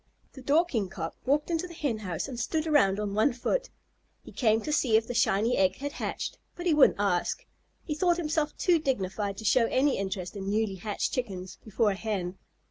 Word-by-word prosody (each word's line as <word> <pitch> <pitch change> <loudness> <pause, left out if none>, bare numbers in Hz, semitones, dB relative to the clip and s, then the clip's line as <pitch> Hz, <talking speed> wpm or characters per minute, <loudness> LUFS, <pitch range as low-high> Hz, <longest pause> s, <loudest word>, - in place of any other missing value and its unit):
The 265 - -11
Dorking 280 - +1
Cock 165 -3 -5
walked 295 +5 +1
into 335 +2 -1
the 340 - -11
Hen 265 -9 -1
house 180 - -4
and 250 -4 -6
stood 315 +4 -1
around 235 -11 +3
on 205 -1 -2
one 215 +7 +3
foot. - - -1 0.5
He - - -12
came 220 -3 +2
to 300 - -4
see 235 -7 +4
if 220 - 0
the 245 - -5
shiny 230 +1 +2
egg 185 -1 +3
had 285 +2 -5
hatched, - - -4 0.2
but 350 - -7
he 345 - +3
wouldn't 300 -2 +5
ask. 200 - 0 0.4
He 305 - -3
thought 345 +3 +2
himself 310 -2 -1
too 350 -3 +3
dignified 200 -7 -2
to 220 - -7
show 230 +2 +4
any 270 0 +2
interest 190 -1 -4
in 195 -1 -4
newly 210 -2 0
hatched 205 +3 -2
Chickens 190 -7 -4
before 215 0 +1
a - - -2
Hen. 190 -3 -3
225 Hz, 210 wpm, -28 LUFS, 195-295 Hz, 0.5 s, wouldn't